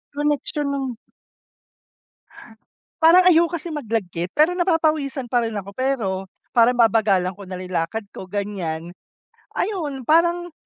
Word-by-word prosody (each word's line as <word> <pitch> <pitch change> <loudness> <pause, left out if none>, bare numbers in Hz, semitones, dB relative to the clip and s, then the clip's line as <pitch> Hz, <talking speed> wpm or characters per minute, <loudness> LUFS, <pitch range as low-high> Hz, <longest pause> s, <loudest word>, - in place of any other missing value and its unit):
connection 290 0 -1
nung 265 -3 -3 2.1
parang 345 +3 +7
ayoko 345 -1 +4
kasi 335 +1 -6
mag-lagkit 215 - -3
pero 310 +4 +4
napapawisan 310 -7 0
pa 245 - +3
rin 220 - -6
ako 200 0 -5
pero, 255 -4 -1 0.4
parang 240 +1 +4
babagalan 215 -6 +3
ko 195 0 -12
nalang 185 0 -7
lakad 175 +6 -2
ko 185 - -9
ganyan. 180 -5 -4 0.6
Ayun, 310 -10 -2
parang 345 +4 +2
255 Hz, 120 wpm, -22 LUFS, 200-315 Hz, 2.1 s, parang